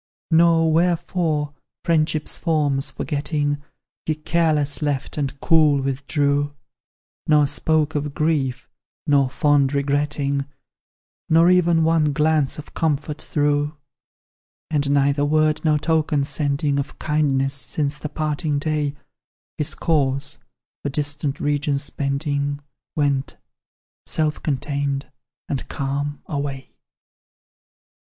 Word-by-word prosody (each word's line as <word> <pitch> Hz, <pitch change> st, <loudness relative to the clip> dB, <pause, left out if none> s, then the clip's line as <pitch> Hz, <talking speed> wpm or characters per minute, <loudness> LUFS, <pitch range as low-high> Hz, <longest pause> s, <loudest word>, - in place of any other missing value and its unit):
"Nor 165 Hz, -1 st, +4 dB
wherefore, 165 Hz, -3 st, +1 dB, 0.3 s
friendship's 155 Hz, -2 st, +1 dB
forms 150 Hz, -4 st, 0 dB
forgetting, 145 Hz, -1 st, -2 dB, 0.5 s
He 155 Hz, -, +1 dB
careless 155 Hz, -2 st, +1 dB
left, 145 Hz, -3 st, -2 dB
and 140 Hz, -2 st, -3 dB
cool 155 Hz, -4 st, +4 dB
withdrew; 140 Hz, +1 st, 0 dB, 0.7 s
Nor 150 Hz, -1 st, +5 dB
spoke 155 Hz, +2 st, +1 dB
of 145 Hz, -1 st, -3 dB
grief, 150 Hz, -5 st, 0 dB, 0.4 s
nor 140 Hz, -2 st, +3 dB
fond 145 Hz, 0 st, +2 dB
regretting, 140 Hz, 0 st, 0 dB, 0.8 s
Nor 165 Hz, +2 st, +6 dB
ev'n 170 Hz, -2 st, +4 dB
one 160 Hz, -2 st, +3 dB
glance 150 Hz, -2 st, +2 dB
of 150 Hz, -, -10 dB
comfort 150 Hz, -1 st, -1 dB
threw. 145 Hz, 0 st, 0 dB, 0.9 s
"And 145 Hz, -2 st, +1 dB
neither 140 Hz, 0 st, +2 dB
word 155 Hz, +1 st, +2 dB
nor 155 Hz, -2 st, +3 dB
token 155 Hz, -2 st, +1 dB
sending, 140 Hz, 0 st, 0 dB
Of 140 Hz, -, -5 dB
kindness, 140 Hz, -3 st, +1 dB
since 145 Hz, +1 st, -2 dB
the 150 Hz, -, -5 dB
parting 150 Hz, 0 st, -1 dB
day, 150 Hz, -1 st, -1 dB, 0.6 s
His 150 Hz, -, 0 dB
course, 140 Hz, -4 st, 0 dB, 0.4 s
for 145 Hz, -, -2 dB
distant 145 Hz, 0 st, -1 dB
regions 145 Hz, 0 st, 0 dB
bending, 140 Hz, 0 st, -1 dB, 0.4 s
Went, 140 Hz, -3 st, 0 dB, 0.7 s
self 155 Hz, -1 st, -1 dB
contained 140 Hz, -1 st, -2 dB, 0.4 s
and 135 Hz, -, -3 dB
calm, 140 Hz, +1 st, -3 dB
away. 140 Hz, -2 st, -4 dB
145 Hz, 105 wpm, -22 LUFS, 140-155 Hz, 0.9 s, Nor